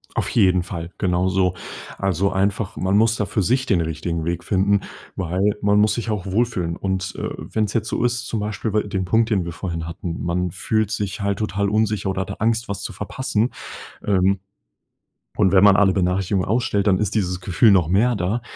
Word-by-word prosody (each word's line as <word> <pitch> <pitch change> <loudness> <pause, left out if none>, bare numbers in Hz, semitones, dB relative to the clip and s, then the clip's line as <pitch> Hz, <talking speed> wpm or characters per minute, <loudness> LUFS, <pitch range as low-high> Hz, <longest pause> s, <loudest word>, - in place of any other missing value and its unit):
Auf - - 0
jeden 95 -5 +3
Fall, 85 -2 -6
genau 90 0 +1
so. 95 -1 +1 0.4
Also, 95 0 0
einfach 100 +2 0
man 95 +2 +1
muss 110 +1 +4
da 105 - -1
für 100 - -1
sich 125 +7 +1
den 100 -8 +2
richtigen 80 0 -3
Weg 85 0 -2
finden, 100 +1 +2 0.3
weil 95 +3 0
man 105 0 +3
muss 105 0 +4
sich 115 +1 -3
auch 105 -3 -2
wohlfühlen. 95 -4 -1
Und, 95 0 -3
äh, - - -3
wenn 110 - -2
es 105 - -6
jetzt 110 -1 0
so - - -1
ist, 120 0 0
zum 115 - -2
Beispiel 105 +1 -3
wei 105 - +3
den 95 -2 -3
Punkt, 115 +5 +2
den 100 -6 +1
wir 85 - -5
vorhin 85 -2 -4
hatten. 85 0 -5
Man 90 +1 -1
fühlt 110 +3 -1
sich 105 -1 -3
halt 100 -1 -1
total 100 -1 -1
unsicher 105 -2 0
oder 95 0 -1
hat 95 - -5
da - - -3
Angst, 115 +2 0
was 100 -1 -4
zu - - -5
verpassen. 115 +2 -1 0.5
Ähm, 95 -1 +2 1.0
und 95 -3 +4
wenn 95 0 +5
man 100 -1 +7
alle 95 -2 +4
Benachrichtigungen 95 0 0
ausstellt, 105 -3 +1
dann 95 -2 +4
ist 105 -1 -1
dieses 90 -4 -1
Gefühl 95 +5 +3
noch 90 -5 +4
mehr 110 +8 +3
da. 100 +5 -1
100 Hz, 210 wpm, -22 LUFS, 90-105 Hz, 1.0 s, man